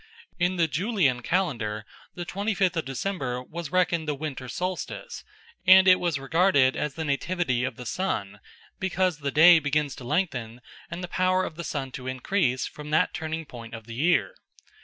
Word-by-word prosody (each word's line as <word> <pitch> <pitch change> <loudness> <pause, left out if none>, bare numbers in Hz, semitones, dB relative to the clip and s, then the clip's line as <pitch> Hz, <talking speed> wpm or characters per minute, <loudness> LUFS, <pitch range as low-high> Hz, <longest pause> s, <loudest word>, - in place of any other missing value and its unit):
In 180 +1 +1
the 170 -2 +2
Julian 155 - +1
calendar 115 - -1 0.3
the 175 - -5
twenty 200 +5 -2
fifth 185 -2 +2
of 165 - -1
December 135 -2 -3
was 165 +2 -7
reckoned 175 -3 +1
the 150 - 0
winter 135 -3 -6
solstice, 180 +7 -4 0.4
and 190 +1 +8
it 185 -1 +7
was 170 -5 0
regarded 140 -1 +3
as 150 -2 -3
the 160 - -3
Nativity 140 -3 0
of 130 -2 -2
the 125 - -9
Sun, 105 - -2 0.4
because 185 -3 0
the 140 -1 -2
day 165 +4 +7
begins 145 -1 0
to - - -9
lengthen 125 -6 -2 0.3
and 170 +2 -6
the - - -3
power 185 +1 +1
of 155 - -7
the 170 - -6
sun 135 -5 -4
to 130 0 -7
increase 130 0 0
from 150 0 -8
that 155 - +2
turning 160 0 -4
point 120 -3 -9
of 110 -1 -10
the 115 - -9
year. 170 - +2
155 Hz, 180 wpm, -26 LUFS, 130-180 Hz, 0.4 s, and